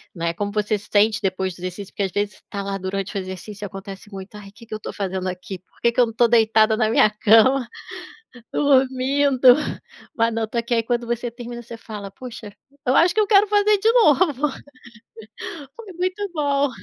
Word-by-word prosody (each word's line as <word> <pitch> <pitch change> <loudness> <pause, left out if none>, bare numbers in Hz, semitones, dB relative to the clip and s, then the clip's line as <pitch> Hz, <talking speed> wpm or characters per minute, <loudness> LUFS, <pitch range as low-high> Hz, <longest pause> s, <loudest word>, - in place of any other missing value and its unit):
né. 170 0 -2
Como 205 +3 -3
você 210 0 0
sente 205 +1 +2
depois 190 -1 -1
do 175 - -16
exercício, 185 +2 -7
porque - - -4
às 190 - -2
vezes 205 0 -3
tá 200 -1 -4
lá 195 0 -3
durante 195 +2 -4
o - - 0
exercício 190 +3 -8
e - - -4
acontece 195 +2 -10
muito 195 +1 -9
"Ai, 200 -1 -10
que 230 +3 -16
que 220 - -10
eu 215 - -4
tô - - -6
fazendo 190 -2 -3
aqui, 185 +1 -7
por 185 - -31
que 235 - +3
que 250 +1 +2
eu 240 - +4
não 225 - -7
tô 235 +1 +4
deitada 220 -1 +4
na 220 -2 +2
minha 215 - +5
cama, 225 +5 +4 0.9
dormindo, 265 -1 +4 0.6
mas 230 0 +2
não 225 -1 -1
tô 235 - -3
aqui", 235 +1 -1
aí 230 - +2
quando 240 0 -2
você 235 0 -2
termina 240 0 -8
você 235 0 -9
fala: 210 -3 -8
"Puxa, 225 -2 -10 0.3
eu 255 - +3
acho 350 +3 +4
que 435 - +3
eu 420 - +2
quero 410 -1 +6
fazer 415 0 +3
de 445 +3 +3
novo. 300 - +3 1.3
Foi 430 -5 -10
muito 370 +3 -2
bom". 285 -2 +1
225 Hz, 205 wpm, -22 LUFS, 200-265 Hz, 1.3 s, quero